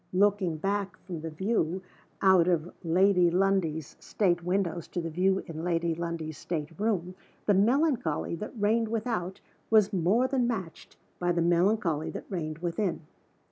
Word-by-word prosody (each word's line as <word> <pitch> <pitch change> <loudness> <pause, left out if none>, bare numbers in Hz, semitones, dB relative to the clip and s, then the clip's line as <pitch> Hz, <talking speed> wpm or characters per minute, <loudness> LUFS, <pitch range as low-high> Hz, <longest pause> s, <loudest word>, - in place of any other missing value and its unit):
Looking 190 -3 +2
back 195 +2 -2
from 175 -4 -6
the 165 - -4
view 185 +1 -1 0.4
out 190 -3 +6
of 175 -1 0
Lady 180 +1 +4
Lundie's 175 -5 0
state 175 -4 0
windows 180 -2 -1
to - - -4
the 165 -1 -4
view 190 +3 +1
in 160 -1 -6
Lady 170 -1 0
Lundie's 160 -2 -4
state 155 -3 -4
room, 190 -5 0 0.3
the 205 - +4
melancholy 235 - +2
that 215 +5 -7
reigned 220 +2 +2
without 215 -5 -3 0.3
was 215 -3 +4
more 195 +8 +2
than 255 -2 +1
matched 190 -9 -5 0.2
by 175 0 +1
the 170 -1 +1
melancholy 170 -2 +2
that - - -7
reigned 155 -4 -3
within. 175 +2 -2
180 Hz, 150 wpm, -28 LUFS, 165-205 Hz, 0.4 s, out